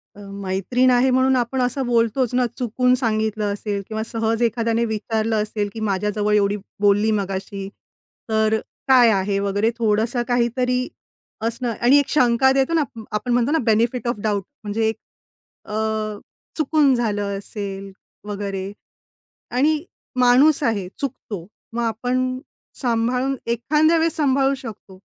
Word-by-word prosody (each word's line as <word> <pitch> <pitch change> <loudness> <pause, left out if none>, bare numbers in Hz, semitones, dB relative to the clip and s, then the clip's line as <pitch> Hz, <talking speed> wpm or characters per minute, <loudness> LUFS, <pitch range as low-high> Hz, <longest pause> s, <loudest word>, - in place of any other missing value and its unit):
अ, - - -14 0.2
मैत्रीण 195 +7 +1
आहे 250 +1 +4
म्हणून 260 +1 +3
आपण 255 +1 0
असं 250 +2 0
बोलतोच 235 +1 +1
ना 250 0 +3
चुकून 250 +1 +1
सांगितलं 215 -4 -1
असेल 205 -1 -3
किंवा 220 0 -3
सहज 225 0 -1
एखाद्याने 230 0 +1
विचारलं 220 0 -1
असेल 210 -1 -3
की 225 - -6
माझ्याजवळ 210 +2 0
एवढी 205 0 +2 0.2
बोलली 205 +2 +3
मगाशी. 195 0 -5 0.6
तर 220 0 +2 0.3
काय 255 -3 +7
आहे 195 0 0
वगैरे? 200 +2 +1
थोडंसं 225 +2 +1
काहीतरी 250 +1 +1 0.6
असणं 235 +1 -2
आणि 250 +4 +6
एक 280 -2 -1
शंका 255 -1 +4
देतो 270 +4 +1
ना, 325 -2 +3 0.3
आपण 215 +4 -2
म्हणतो 245 +3 +2
ना 320 - +3
बेनिफिट 235 +2 +1
ऑफ 240 -3 -1
डाऊट 205 -2 0 0.2
म्हणजे 215 +2 0
एक 220 - 0 0.7
अ, 210 - -4 0.8
चुकून 300 -2 +3
झालं 205 -4 -1
असेल 195 -1 -6 0.4
वगैरे 200 -1 -4 0.8
आणि 300 +4 +2 0.4
माणूस 255 +5 +5
आहे. 210 -7 0
चुकतो. 225 -9 -5 0.3
मग 235 +1 -1
आपण 250 +3 -1 0.4
सांभाळून 250 +2 0
एखाद्यावेळेस 310 +8 +2
सांभाळू 275 -2 +2
शकतो. 215 -6 -10
230 Hz, 135 wpm, -21 LUFS, 210-255 Hz, 0.8 s, काय